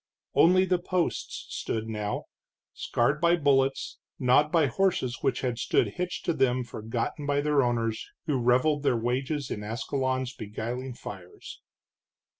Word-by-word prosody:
Only 185 +3 +5
the 180 -1 +1
posts 180 -1 -2
stood 110 0 -3
now, 105 -2 -3 0.5
scarred 140 +7 0
by 170 0 +5
bullets, 135 -4 +1 0.2
gnawed 135 +4 +4
by 165 -3 +4
horses 135 -5 0
which 125 - 0
had 125 -2 -2
stood - - +2
hitched 180 0 -4
to 170 - +2
them 130 -3 +2
forgotten 120 +6 -4
by 145 0 +2
their 145 -1 +3
owners 115 -3 -1 0.2
who 145 -4 0
reveled 130 +5 +3
their 135 -4 +2
wages 130 +4 -2
in 105 - -4
Ascalon's 130 +3 -2
beguiling 120 +4 -5
fires. 95 -6 -10
130 Hz, 140 wpm, -28 LUFS, 120-150 Hz, 0.5 s, Only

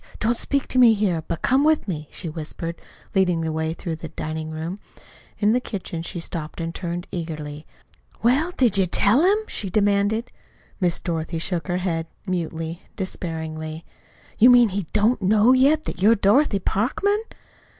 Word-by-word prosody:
Don't 230 +2 +1
speak 280 +3 -1
here, 215 -9 +4
but 170 - -4
come 265 +2 +3
with 310 -4 +2
me," 155 -5 -4
she 175 - -7
whispered, 165 +1 -6 0.3
leading 180 -3 +2
the 160 0 -2
way 160 0 -1
through 165 0 -5
the 160 - -7
diningroom. 160 +3 -5 0.6
In 210 +1 +3
the 250 - +3
kitchen 190 -8 -5
she 170 +1 -5
stopped 165 -1 -6
and 165 0 -3
turned 175 0 -4
eagerly. 155 -3 -6 0.6
"Well, 270 +8 +3
did 240 - +3
you 190 - +3
tell 205 - +4
him?" 385 +4 +4
she 200 - -3
demanded. 205 +4 +1 0.5
Miss 175 -3 +1
Dorothy 165 -1 -3
shook 170 0 -2
her 175 -1 0
head, 165 -3 -2 0.2
mutely, 165 -2 -3
despairingly. 160 -4 -5 0.5
"You 240 +3 +8
mean 245 -2 +7
he 190 -3 -3
don't 215 +2 +2
know 210 +5 +5
yet 285 +4 +4
that - - -6
you're 220 +4 +6
Dorothy 210 +3 +3
Parkman?" 270 - 0
185 Hz, 160 wpm, -23 LUFS, 165-225 Hz, 0.6 s, You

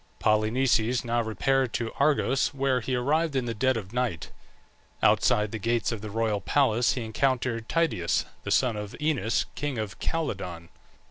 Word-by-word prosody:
Polynices 115 +2 +2
now 120 0 +1
repaired 120 +3 0
to 115 -1 -2
Argos, 140 -1 +2
where 135 -1 +1
he 130 +3 -2
arrived 150 +5 +1
in 130 -2 0
the 115 - -2
dead 130 +3 +1
of 100 -1 -7
night. 125 -9 -2 0.7
Outside 105 0 +3
the 110 - -4
gates 115 +1 0
of 115 -3 -4
the 110 - -6
royal 110 -1 -1
palace 120 0 +2
he 125 - -3
encountered 115 0 -1
Tydeus, 165 - +1 0.2
the - - -5
son 125 -4 +2
of 105 -1 -6
Oeneus, 145 -8 0
king 145 -4 -3
of 110 -3 -5
Calydon. 90 - -3
120 Hz, 160 wpm, -27 LUFS, 110-135 Hz, 0.7 s, Outside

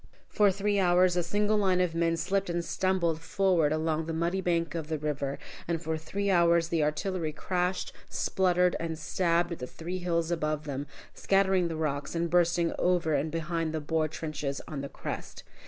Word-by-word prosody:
For 205 -2 +3
three 200 +1 0
hours 180 -1 +4
a 175 - +2
single 205 +5 +1
line 190 -3 +2
of 180 -2 +1
men 165 0 +1
slipped 195 +3 0
and 170 0 -1
stumbled 175 -4 0
forward 175 -4 +2
along 155 0 0
the 165 - -2
muddy 170 +4 0
bank 170 -2 0
of 165 -3 -4
the 160 0 -1
river, 140 -2 -2 0.3
and 170 -1 0
for 160 -1 -2
three 195 +6 -2
hours 170 -2 +4
the 165 -2 +1
artillery 155 +2 -1
crashed, 180 +3 -2 0.2
spluttered, 180 -1 +2
and 165 -1 -3
stabbed 170 +2 +1
at 170 - -4
the 125 - -5
three 175 +6 -5
hills 170 -2 0
above 155 -2 -1
them, 140 -1 -4 0.3
scattering 190 -2 +2
the 165 - -4
rocks 150 -1 -2
and 170 0 -1
bursting 170 -1 +3
over 175 -3 +2
and 145 +2 +1
behind 165 0 -2
the - - 0
Boer 155 +1 0
trenches 150 -3 -4
on 145 -3 -4
the 140 - -5
crest. - - -6
170 Hz, 190 wpm, -29 LUFS, 155-180 Hz, 0.3 s, hours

